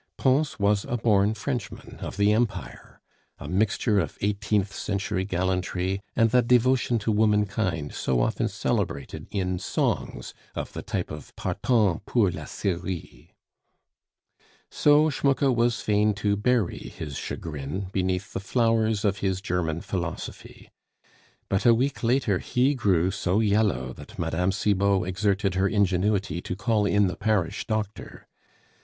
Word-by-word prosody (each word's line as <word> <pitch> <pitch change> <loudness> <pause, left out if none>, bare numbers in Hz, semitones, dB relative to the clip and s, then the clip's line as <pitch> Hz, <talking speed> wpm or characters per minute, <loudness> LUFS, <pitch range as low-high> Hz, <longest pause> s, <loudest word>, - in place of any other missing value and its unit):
Pons 135 +3 +2
was 100 0 +2
a 120 - -2
born 105 -2 +3
Frenchman 120 0 -5
of - - -6
the 100 +1 +4
Empire; 115 0 -3 0.4
a - - -8
mixture 105 +2 +1
of - - -3
eighteenth 105 0 0
century 100 -1 -2
gallantry 95 0 -1
and 115 -1 +3
that 125 -2 +3
devotion 125 0 +3
to 110 0 -1
womankind 105 -7 +1
so 65 -2 0
often - - +1
celebrated 70 - -2
in 90 -3 -2
songs - - -2 0.2
of - - -5
the - - -5
type - - -3
of 75 -2 -9
Partant 105 -9 +1
pour 105 -7 +3
la - - -7
Syrie. 90 -2 -5 1.4
So 150 +1 +4
Schmucke 135 -1 +2
was 120 -1 +1
fain 105 0 +2
to 100 0 +1
bury 105 -2 +1
his 75 -3 -7
chagrin 80 +7 -5
beneath 95 0 -1
the - - -2
flowers 110 0 +1
of 100 -1 +1
his 95 -2 0
German 85 -4 -2
philosophy; 85 -3 -6 0.8
but 95 - 0
a 120 -1 +6
week 135 +4 -1
later 115 -5 +2
he 130 +3 +1
grew 95 - +2
so 95 +1 0
yellow 100 - +1
that - - -12
Mme. 85 +2 0
Cibot 100 -1 +1
exerted 100 +1 0
her 95 +1 +2
ingenuity 100 -3 +1
to 90 - -4
call 105 0 +1
in 105 0 +3
the 90 -2 -1
parish 105 -6 -1
doctor. 110 -2 -4
100 Hz, 140 wpm, -26 LUFS, 95-110 Hz, 1.4 s, a